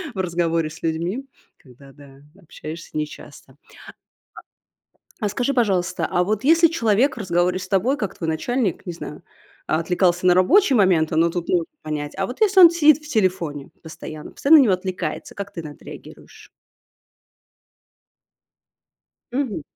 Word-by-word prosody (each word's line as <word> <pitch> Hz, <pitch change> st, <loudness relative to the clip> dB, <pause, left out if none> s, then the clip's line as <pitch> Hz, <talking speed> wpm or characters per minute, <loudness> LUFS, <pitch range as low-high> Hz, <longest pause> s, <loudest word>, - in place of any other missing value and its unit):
В -, -, -5 dB
разговоре 170 Hz, -3 st, -1 dB
с 165 Hz, -, -13 dB
людьми. 170 Hz, +10 st, -2 dB, 0.3 s
Когда 135 Hz, +1 st, -17 dB
да. 140 Hz, -1 st, -17 dB, 0.2 s
Общаешься 160 Hz, -1 st, -9 dB
нечасто. 145 Hz, -3 st, -8 dB, 1.6 s
А 220 Hz, -, -3 dB
а -, -, 0 dB
скажи, 245 Hz, +7 st, -1 dB
пожалуйста, 190 Hz, -7 st, 0 dB
а 180 Hz, -, +2 dB
вот 215 Hz, +4 st, -2 dB
если 330 Hz, +3 st, +5 dB
человек 240 Hz, -3 st, +1 dB
в -, -, -9 dB
разговоре 180 Hz, -1 st, 0 dB
с -, -, -8 dB
тобой, 205 Hz, +8 st, +1 dB
как 205 Hz, -, -4 dB
твой 165 Hz, -, -4 dB
начальник 210 Hz, +4 st, -2 dB
не 175 Hz, -, -4 dB
знаю, 150 Hz, -3 st, -9 dB, 0.4 s
отвлекался 175 Hz, +2 st, 0 dB
на 180 Hz, -, +6 dB
рабочие 275 Hz, -, +4 dB
моменты, 175 Hz, -6 st, +2 dB
но 165 Hz, +1 st, +3 dB
тут 170 Hz, 0 st, -4 dB
можно 170 Hz, -2 st, +1 dB, 0.2 s
понять. 150 Hz, -1 st, -4 dB
А 195 Hz, -, 0 dB
вот 250 Hz, -, -9 dB
если 400 Hz, -3 st, +4 dB
он 345 Hz, -2 st, +9 dB
сидит 305 Hz, -4 st, +5 dB
в -, -, -11 dB
телефоне 175 Hz, -, -1 dB
постоянно. 155 Hz, -1 st, -9 dB
Постоянно 315 Hz, +3 st, +5 dB
на -, -, +6 dB
него 205 Hz, -7 st, +3 dB
отвлекается, 185 Hz, 0 st, -5 dB
как 200 Hz, 0 st, -7 dB
ты 170 Hz, -, -6 dB
на 155 Hz, -, -7 dB
это -, -, -21 dB
реагируешь? -, -, -13 dB, 2.8 s
Мгм. 250 Hz, -, -2 dB
180 Hz, 155 wpm, -21 LUFS, 160-235 Hz, 2.8 s, он